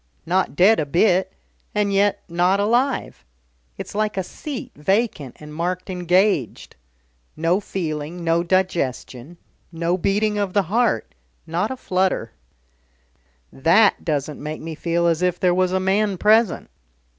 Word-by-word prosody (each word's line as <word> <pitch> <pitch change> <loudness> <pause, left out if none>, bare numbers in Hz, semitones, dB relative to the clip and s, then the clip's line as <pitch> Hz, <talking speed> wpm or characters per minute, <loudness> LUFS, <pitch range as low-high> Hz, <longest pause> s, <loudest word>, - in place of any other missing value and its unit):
Not 185 -2 0
dead 200 +7 +5
a 150 - -1
bit, 180 +4 +2 0.4
and 205 -1 +1
yet 200 +1 +2
not 180 +3 +1
alive. 240 - 0 0.5
It's - - -7
like 215 0 -1
a 190 - 0
seat 280 - -7
vacant 175 - -1
and 150 0 -11
marked 180 +4 -3
'engaged.' 180 - 0 0.6
No 165 +4 +1
feeling, 165 -3 -5
no 165 0 +2
digestion, 170 -5 -2 0.3
no 170 +2 -1
beating 210 +3 0
of 200 -3 -2
the 200 - +3
heart 230 - +1 0.3
not 175 +6 -1
a 260 - -5
flutter. 185 - -1 1.2
That 185 +10 +3
doesn't 150 -2 -3
make 150 +1 -5
me 160 0 -6
feel 170 +2 -1
as 165 0 +1
if 180 -1 0
there 180 -1 +3
was 185 0 +1
a 190 - +1
man 195 +1 +1
present. 215 +1 +2
180 Hz, 140 wpm, -21 LUFS, 165-200 Hz, 1.2 s, dead